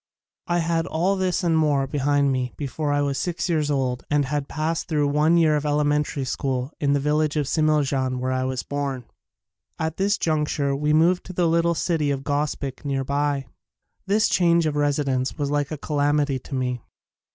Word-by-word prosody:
I 175 - +1
had 165 0 0
all 180 +5 +1
this 185 -1 0
and 170 -2 +2
more 150 -3 +2
behind 140 0 +1
me 130 -2 -2
before 145 +1 -3
I 145 0 +2
was 140 -1 -1
six 175 +5 -2
years 155 -4 0
old 130 -3 -1
and 145 -1 +2
had 145 +1 -2
past 160 +2 -2
thru 150 -3 +1
one 150 +4 +3
year 160 -2 +4
of 145 - -1
elementary 150 -1 0
school 130 0 -2
in 140 -1 +2
the 145 - +2
village 150 +1 +1
of 150 -2 +1
Smiljan 140 -4 +1
where 130 +1 -2
I 130 0 0
was 130 -1 -2
born. 140 -3 -3 0.7
At 160 0 -3
this 200 +1 +1
junc 155 -2 0
ture 140 -1 0
we 150 +2 0
moved 170 +4 +3
to 185 - -7
the 175 -1 +1
little 170 +1 +2
city 160 -3 0
of 135 -1 -2
Gospic 145 -2 -2
nearby. 140 0 -1 0.6
This 210 +3 +3
change 170 -2 +3
of 155 -2 -1
residence 140 -3 0
was 145 -1 -2
like 145 -1 0
a 155 - -4
calamity 145 -1 0
to 135 - -7
me. 125 -2 -2
145 Hz, 190 wpm, -23 LUFS, 140-160 Hz, 0.7 s, year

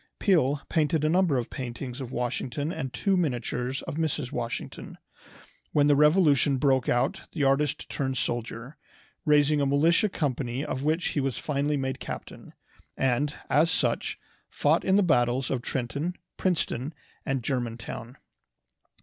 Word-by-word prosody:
Peale 150 -7 +2
painted 155 -1 +1
a 155 - +3
number 175 -4 +3
of 120 - -3
paintings 125 0 -5
of 125 -2 -6
Washington 130 +5 -2
and 135 -6 -4
two 195 - +1
miniatures 125 -5 -1
of - - -5
Mrs. 150 -5 -1
Washington. 115 - -5 0.8
When 145 -1 +4
the 145 0 +5
Revolution 150 -3 +4
broke 130 -2 +2
out 120 - 0
the 150 - -1
artist 135 +1 +1
turned 130 -2 -2
soldier, 120 +3 -3 0.5
raising 150 -1 +4
a - - +2
militia 165 +9 +3
company 135 -4 -2
of 130 - -3
which 160 +4 +1
he - - -1
was 135 -2 -1
finally 145 0 0
made 130 -1 -2
captain, - - -8 0.4
and, 135 +3 +1
as 160 +3 +4
such, - - 0 0.3
fought - - +2
in 190 - +3
the 205 - +5
battles 125 -5 +2
of 130 -3 -1
Trenton, 140 +8 -2 0.2
Princeton, 155 -5 -1 0.3
and 135 -3 -2
Germantown. 120 -1 -4
140 Hz, 145 wpm, -27 LUFS, 125-155 Hz, 0.8 s, the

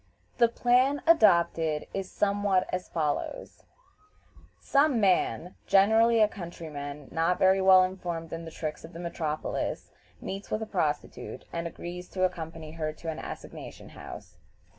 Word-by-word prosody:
The 235 - +7
plan 250 +4 +2
adopted 170 - +4
is 195 -1 -4
somewhat 200 -2 +1
as 185 0 -3
follows: 160 - -3 0.9
Some 280 -3 +3
man, 180 - +1
generally 220 +4 +5
a 215 - +6
countryman 150 -7 -7
not 165 +2 +1
very 190 0 +4
well 190 -1 +7
informed 175 -3 -4
in 165 0 -5
the 165 - -7
tricks 155 -1 -5
of 160 - -11
the 165 - -8
metropolis, 160 -3 -3 0.3
meets 195 +1 -6
with 215 - -1
a - - -4
prostitute, 155 -8 -3
and 170 0 -2
agrees 175 +1 -8
to 185 -1 +1
ac 185 - 0
company 160 -2 -7
her 155 -1 -3
to 165 +1 -7
an 155 - -7
assignation - - -9
house. - - -11
180 Hz, 145 wpm, -28 LUFS, 160-200 Hz, 0.9 s, The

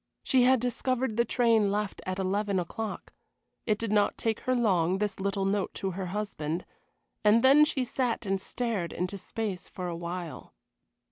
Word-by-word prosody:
She 255 -2 +4
had 260 0 +5
discovered 250 0 -1
the 235 +1 +3
train 225 -4 +3
left 210 0 -2
at 185 0 -2
eleven 195 +1 0
o'clock. 215 +5 -5 0.5
It 215 -2 +2
did 225 -1 -3
not 205 -1 +2
take 225 -1 -1
her 255 - 0
long, 190 -6 +2
this 205 -1 -2
little 195 0 -1
note 195 0 0
to 195 - -2
her 185 +1 -4
husband, 180 -4 -3 0.6
and 215 +2 +5
then 280 +3 +7
she 285 -4 -1
sat 245 -2 -1
and 195 -1 0
stared 220 -7 -2
into 180 +3 -3
space 205 -2 -4
for 180 -1 -5
a 170 - -3
while. 170 0 -6
205 Hz, 175 wpm, -29 LUFS, 185-235 Hz, 0.6 s, then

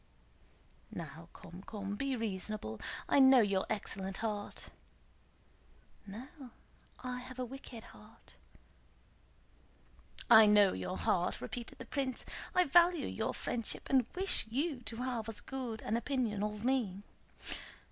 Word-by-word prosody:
"Now - - -8
come, 175 +3 -11
come! 200 -1 -5
Be 270 +4 -1
reasonable. 205 - -3 0.3
I - - +4
know 265 -2 +8
your 195 -3 +1
excellent 195 -2 -3
heart." 210 -2 -4 1.4
"No, 220 +7 -7 0.8
I 250 0 -3
have 255 +1 -9
a 255 - -2
wicked 245 -2 -9
heart." - - -16 1.9
"I 220 -1 +9
know 205 -2 +6
your 90 -1 -3
heart," - - +1
repeated 235 - -6
the 255 - -8
prince. 260 0 -2 0.3
"I 365 - +6
value 345 0 +5
your 220 - -2
friendship 235 +1 -3
and 260 -3 +4
wish 375 -9 +1
you 275 +2 -1
to 225 - -5
have 240 -2 -2
as 210 -2 -1
good 245 -2 -5
an 215 - 0
opinion 235 -4 0
of 210 +1 -2
me. 225 -7 +1
230 Hz, 125 wpm, -34 LUFS, 205-260 Hz, 1.9 s, I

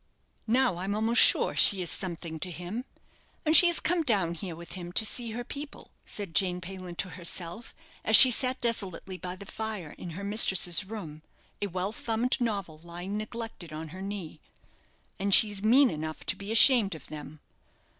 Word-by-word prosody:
"Now 245 -4 +1
I'm 195 +3 -4
almost 225 +2 +3
sure - - +6
she 190 -2 +5
is 170 - 0
something 170 -4 -3
to 180 - -4
him; 180 +8 -7 0.6
and 310 +1 +3
she 350 - +8
has 345 - +2
come 345 +1 0
down 200 - -1
here 170 0 -8
with 170 +1 -12
him 175 -1 -8
to 220 - +2
see 235 +2 -2
her 240 +2 -5
people," 285 +4 -10 0.2
said 200 -5 -4
Jane 180 +2 +1
Payland 180 -1 -10
to 185 +5 -4
herself, 175 +4 -6 0.3
as 220 - +4
she 255 - +11
sat 255 +2 0
desolately 190 -5 -4
by 180 0 -7
the 200 +2 -12
fire 215 -7 -7
in 180 - -8
her 200 - -7
mistress's 190 -3 +3
room, 180 -8 -9 0.4
a 205 - -2
well 185 +2 -4
thumbed 235 +3 -2
novel 200 -9 -4
lying 175 +4 -8
neglected 215 -5 -7
on 155 +1 -8
her 185 +4 -10
knee; 195 -6 -7 0.8
"and 195 0 +3
she's 205 -3 +4
mean 250 +5 +4
enough 155 0 -7
to 170 - 0
be 200 +2 -8
ashamed 225 - +6
of 155 - -13
them. 150 0 -11
195 Hz, 185 wpm, -27 LUFS, 175-225 Hz, 0.8 s, she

